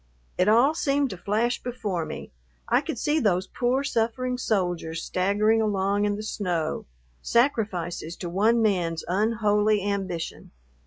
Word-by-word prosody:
It 180 +3 +2
all 240 +7 +5
seemed 285 -4 +1
to - - -5
flash 220 +6 0
before 210 -9 -3
me - - -7 0.4
I - - +3
could - - -5
see 300 +2 +1
those 190 - +1
poor, 250 +6 0
suffering 250 0 -1
soldiers 175 -7 -1
staggering 210 +4 +2
along 200 -1 +1
in 205 0 0
the 210 - -6
snow, 175 - -2 0.3
sacrifices 190 - 0
to 180 - -6
one 220 +6 +2
man's 175 -6 0
unholy 210 +1 +2
ambition. 190 -5 -3
205 Hz, 140 wpm, -26 LUFS, 180-230 Hz, 0.4 s, all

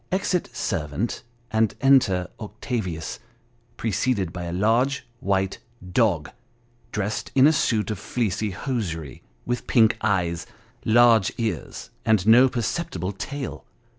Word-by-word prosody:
Exit 185 -1 0
servant, 75 +9 -2 0.3
and 110 -1 +2
enter 125 -10 +4
Octavius 105 - -4 0.6
preceded 105 -4 0
by 90 -1 -5
a 85 - -4
large 120 +8 +1
white 95 -1 0 0.3
dog, 95 -8 +2 0.6
dressed 105 0 -3
in 135 0 +7
a 155 - +6
suit 110 -7 +1
of 105 - -4
fleecy 110 -3 -1
hosiery, 90 - -4 0.2
with 120 0 -3
pink 115 -2 +4
eyes, 90 -5 0 0.4
large 115 -3 +5
ears, 110 -8 -4
and 110 -4 +2
no 120 +4 +7
perceptible 110 - -2
tail. 135 +7 -6
110 Hz, 115 wpm, -24 LUFS, 95-120 Hz, 0.6 s, in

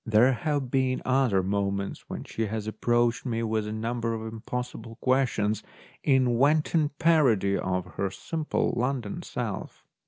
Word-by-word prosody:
There 115 +4 +4
have 140 -1 -1
been 130 -1 +2
other 125 -7 +3
moments 100 0 -2
when - - -5
she 110 -1 -3
has 110 0 -3
approached 120 +2 +1
me 115 -3 -1
with 110 -1 -1
a - - -4
number 115 +1 -2
of 110 0 -5
impossible 120 0 -5
questions 125 -5 +1 0.4
in 130 -4 +3
wanton 150 +2 +3
parody 130 - +4
of 90 -2 -1
her 95 +2 -3
simple 155 - -2
London 125 -4 -1
self. - - -5
120 Hz, 145 wpm, -27 LUFS, 110-130 Hz, 0.4 s, There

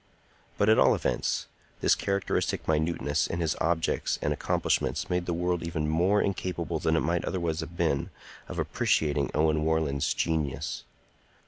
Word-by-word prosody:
But, 100 - +2
at 110 - +5
all - - +5
events, - - -1 0.4
this - - +5
characteristic 100 -1 -1
minuteness 80 -2 +1
in 85 - -3
his 80 -2 0
objects 80 0 0
and - - 0
accomplishments - - 0
made 90 0 0
the - - 0
world 90 0 0
even 80 -2 -2
more 90 +7 +3
incapable 90 -4 -2
than 80 +1 +1
it 80 - +2
might 85 +1 0
otherwise 85 -4 -2
have 85 - -6
been 80 -6 0 0.4
of - - -7
appreciating 75 -2 +1
Owen 75 0 +2
Warland's 80 -3 +1
genius. 75 -5 -2
80 Hz, 150 wpm, -28 LUFS, 80-85 Hz, 0.4 s, at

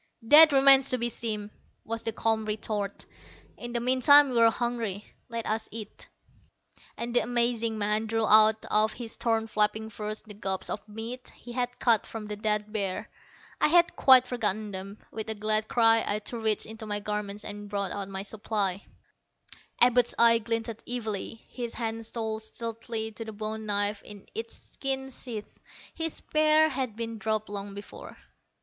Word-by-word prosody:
"That 305 +6 +9
remains 270 -1 +6
to 255 - +2
be 240 0 -1
seen," 215 -3 -3 0.3
was 230 0 -4
the 225 - -3
calm 220 0 -1
retort. 210 -1 -3 0.5
"In 240 0 -7
the 235 - -1
meantime, 260 +4 +6
we're 230 -2 +5
hungry. 225 -4 -3 0.2
Let 230 -1 -4
us 220 +1 -2
eat." 215 -1 -8 0.9
And 235 +1 -4
the - - +7
amazing 235 -1 0
man 210 +1 +1
drew 225 0 0
out 215 0 +5
of 215 +1 +3
his 235 -2 -4
torn 225 -1 0
flapping 220 0 -1
furs 215 0 -6
the 215 - -10
gobs 195 -2 -3
of 210 +1 -6
meat 230 +4 -7
he 240 - -12
had 245 0 -2
cut 230 -3 +2
from 225 -2 -7
the 210 0 -5
dead 210 0 -1
bear. 195 -4 -3 0.5
I - - +5
had 345 +2 +4
quite 260 -2 +7
forgotten 215 -4 -1
them. 195 +2 -6
With 220 0 -5
a 220 - -2
glad 215 +1 +1
cry, 225 -1 +4
I 205 - +1
too 230 +3 -5
reached 220 -1 +1
into 220 0 -9
my 205 0 -2
garments 210 0 -4
and 205 0 -7
brought 200 -2 -2
out 200 -1 -4
my 195 0 -4
supply. 205 -2 -3 1.0
Abud's 245 0 +4
eyes 230 0 +5
glinted 230 0 -3
evilly. 225 -2 -4
His 240 -2 -6
hand 225 -1 -3
stole 220 -2 -3
stealthily 225 0 -5
to 225 - -7
the 220 - -7
bone 215 +1 -5
knife 205 0 0
in 205 -2 -12
its 230 +1 -6
skin 265 -1 -4
sheath. 235 -4 -8 0.3
His 325 -1 -3
spear 310 0 +3
had 260 -6 -3
been 230 -1 -5
dropped 215 -1 -2
long 200 -1 -6
before. 205 0 -10
220 Hz, 170 wpm, -28 LUFS, 210-235 Hz, 1.0 s, That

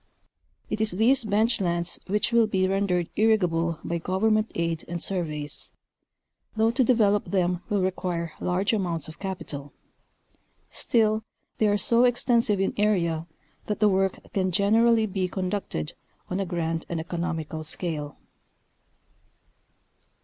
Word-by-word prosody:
It 215 0 -3
is 220 -3 0
these 235 +6 +3
bench 215 +2 +2
lands 170 -1 -1
which 210 +4 +1
will 235 -1 +4
be 190 -3 +1
rendered 190 -3 0
irrigable 170 -7 +2
by 170 0 -2
vovernment 215 +5 +1
aid 165 -1 -1
and 175 0 -4
surveys, 155 -5 -3 0.9
though 220 +1 +3
to 255 +2 +2
develop 215 -4 +3
them 180 -2 0
will 205 -2 +1
require 175 -3 -2
large 190 +4 0
amounts 175 -7 -1
of 160 - -11
capital; 150 -7 -6 1.0
still, 220 -2 +1 0.4
they 215 - +4
are 205 0 +3
so 235 +4 +3
extensive 235 -4 +2
in 195 - +1
area 170 -6 +1 0.4
that 210 - -2
the 210 0 +5
work 190 -1 +1 0.2
can 185 -2 +1
generally 220 +4 +4
be 190 -2 -1
conducted 185 - -3 0.4
on 185 - -1
a 195 - -1
grand 165 -2 -2
and 170 - -2
economical 160 -2 -3
scale. 155 -3 -4
190 Hz, 135 wpm, -26 LUFS, 170-215 Hz, 1.0 s, the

